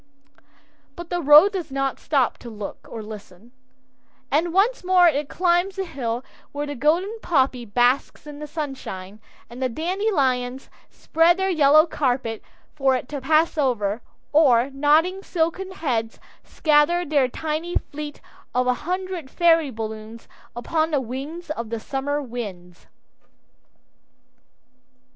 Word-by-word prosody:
But 345 -1 -9
the 350 0 -1
road 300 +6 +8
does 360 -6 -4
not 275 0 -2
stop 275 -5 0
to 240 - -9
look 210 -2 -8
or 225 -2 -7
listen, 210 0 -11 0.8
and 325 +5 +1
once 405 +7 +2
more 360 -1 +5
it 295 -2 0
climbs 360 +1 +1
the 385 -1 -3
hill 250 -6 -4 0.3
where 290 +1 -3
the 290 - -5
golden 340 - 0
poppy 260 -6 +1
basks 245 +7 +1
in 295 -1 -9
the 300 - -6
sunshine, 260 - -6 0.3
and 240 +2 -10
the 260 - +1
dandelions 275 - -1 0.2
spread 330 +2 +2
their 380 0 0
yellow 310 -1 +6
carpet 250 -8 -1 0.3
for 270 -3 +2
it 250 - -4
to 285 -2 -5
pass 315 +3 +2
over, 230 -5 0 0.3
or, 270 -4 +4
nodding 310 +7 +2
silken 360 +1 -2
heads 245 -11 -3 0.2
scatter 315 +3 +2
their 285 -4 +2
tiny 315 +6 -4
fleet 295 0 -5 0.3
of 250 0 +2
a 250 - +3 0.2
hundred 365 -5 -3
fairy 330 -2 +3
balloons 220 -1 -7 0.3
upon 315 +6 0
the 295 -3 +1
wings 280 +7 -6
of 230 -7 -4
the 230 0 -3
summer 275 +4 -2
winds. 195 -8 -8
290 Hz, 135 wpm, -23 LUFS, 245-335 Hz, 0.8 s, road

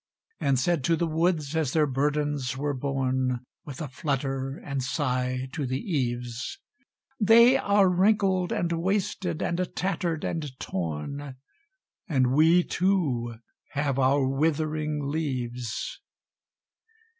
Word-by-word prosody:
And 135 -1 +2
said 160 +2 +1
to 165 - +3
the 170 - 0
woods, 160 -2 0
as 155 -5 0
their 155 -2 +4
burdens 145 -1 -1
were 145 +1 -1
borne 130 -2 -1 0.2
With 145 +1 -7
a - - -4
flutter 135 0 -2
and 140 -2 -4
sigh 130 -1 -1
to 145 -4 -2
the 130 +1 -1
eaves, 125 - -3 0.6
"They 235 +4 +7
are 200 -6 +4
wrinkled 190 -1 +2
and 170 -1 0
wasted, 180 -1 -1
and 170 - -1 0.2
tattered 175 -4 -1
and 150 -6 -3
torn, 95 - -4 0.7
And 130 -4 +2
we 165 +5 +5
too 150 -13 0 0.4
have 140 -2 0
our 135 +1 +3
withering 155 +1 0
leaves." 125 -6 -3
145 Hz, 120 wpm, -27 LUFS, 130-170 Hz, 0.7 s, They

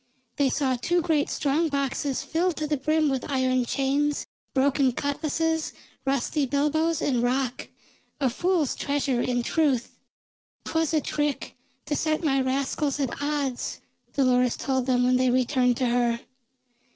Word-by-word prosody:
They 280 -2 +3
saw 260 -2 +1
two 345 +8 +1
great 310 -3 +1
strong 305 +3 +1
boxes 280 -1 -1
filled 340 +1 0
to 310 - -2
the 300 0 0
brim 310 +3 +1
with 270 -1 -2
iron 255 -2 +1
chains, 280 +3 0 0.3
broken 270 -1 +2
cutlases, 315 +4 -1 0.3
rusty 275 +2 0
bilboes, 305 +4 +1
and 250 -4 +1
rock; 250 +1 -1 0.5
a 275 - +2
fool's 345 0 +1
treasure 280 -3 0
in 245 -1 0
truth. 275 -4 +1 0.7
"'Twas 320 0 0
a 310 - +3
trick 295 -1 -2 0.3
to 295 - -1
set 310 +1 0
my 270 -3 +2
rascals 275 +2 -1
at 275 0 -2
odds," 285 -3 -2 0.3
Dolores 250 -3 +2
told 260 -2 -1
them 250 -1 +3
when 250 0 +3
they 255 0 +2
returned 250 -1 +2
to 255 - 0
her. 235 -1 +1
275 Hz, 145 wpm, -26 LUFS, 255-300 Hz, 0.7 s, They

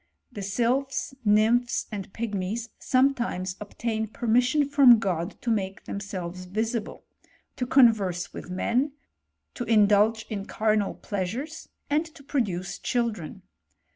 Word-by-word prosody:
The 210 - -7
sylp! 240 +7 +1 0.3
nymphs, 225 +3 +3
and 195 -3 -6
pigmies, 220 +1 -3
sometimes 240 -9 +1
obtain 220 +1 -3
permissi 245 +6 +2
from 275 -4 +7
God 180 -3 -2
to 235 - 0
make 195 -3 -2
themselves 185 -3 -5
visible, 220 +4 -3 0.5
to 250 - -3
convei 205 -9 +3
with - - -8
men, 245 +10 0 0.6
to 245 - -4
indulge 215 0 +4
in 205 -2 -5
carnal 215 -2 +1
pleasures, 225 - -4 0.2
and 300 +2 +2
to 280 - -14
pid^ 275 -3 +1
duce 185 -1 -5
children. 225 - -2
220 Hz, 120 wpm, -26 LUFS, 195-245 Hz, 0.6 s, from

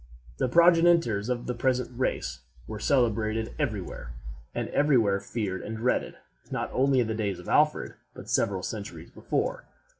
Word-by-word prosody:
The - - +1
progenitors 165 - +4
of 120 -1 -2
the 125 - -2
present 125 +1 0
race 60 - -2 0.3
were 110 -1 -6
celebrated 110 -3 +1
every 110 -9 0
where, - - -8 0.4
and - - -2
every 145 -2 +3
where 100 -4 +2
feared 100 -2 -3
and 110 +1 -5
dreaded, 120 +3 0 0.3
not - - -3
only 135 0 +3
in 115 - 0
the 110 - -1
days 105 -4 -2
of 90 - -11
Alfred, 150 0 +2 0.2
but - - -10
several 95 -2 0
centuries 105 0 -6
before. - - -2
115 Hz, 160 wpm, -27 LUFS, 100-130 Hz, 0.4 s, progenitors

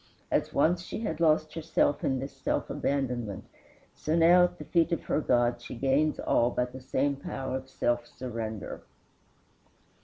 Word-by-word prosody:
As - - +1
once 170 +5 +2
she 180 - -6
had 160 -8 -3
lost 155 -1 +3
herself 160 -2 +1
in 135 - +1
this 135 +2 -5
self - - -2
abandonment, 125 -7 -2 0.5
so 155 - -2
now 170 +2 +6
at 175 0 -5
the - - -8
feet 170 0 +2
of 170 - -1
her - - 0
God 120 -2 +2
she 120 - -8
gains 135 +5 +1
all 120 - +2
by 125 0 0
the 130 +1 -10
same 140 +2 0
power 135 -1 -4
of 130 0 -6
self 120 -2 0
surrender. 115 -4 -5
135 Hz, 165 wpm, -29 LUFS, 125-160 Hz, 0.5 s, now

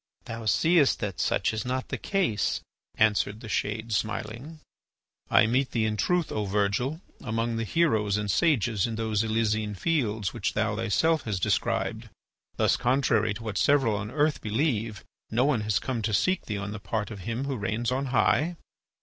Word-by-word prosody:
"Thou 115 0 -6
seest 155 - +3
that 100 -4 -3
such - - +1
is 110 -1 -2
not 130 +1 -3
the - - -2
case," 180 - 0 0.3
answered 105 -1 +2
the 115 - -9
shade, 110 +2 -2
smiling. 115 +8 -3 0.7
"I - - +6
meet 130 +4 +1
thee 115 -2 +1
in 110 0 0
truth, 175 - 0
O 105 -1 -1
Virgil, 105 - 0 0.2
among 115 -1 -1
the 115 - -1
heroes 110 -7 +2
and 105 -1 -1
sages 120 - +2
in 115 - -4
those 110 -1 0
Elysian 110 -1 0
Fields 110 - 0
which - - -2
thou 110 0 +1
thyself 115 +9 +1
hast 100 -5 -2
described. - - 0 0.5
Thus, - - +2
contrary 120 -5 +2
to 115 - -8
what 110 -3 -2
several 135 -7 +3
on 105 +1 -4
earth 150 +3 +1
believe, 110 -2 -1 0.3
no 120 +4 +2
one 135 -6 +2
has 105 -1 +1
come 125 -4 -2
to 105 -1 0
seek 185 - +1
thee 105 - -2
on 100 +1 -4
the 105 - -6
part 110 +1 -3
of 105 - -7
Him 115 +8 -3
who 140 -1 -2
reigns 110 +3 -2
on 135 +2 -1
high?" 145 +7 +2
110 Hz, 180 wpm, -27 LUFS, 105-130 Hz, 0.7 s, I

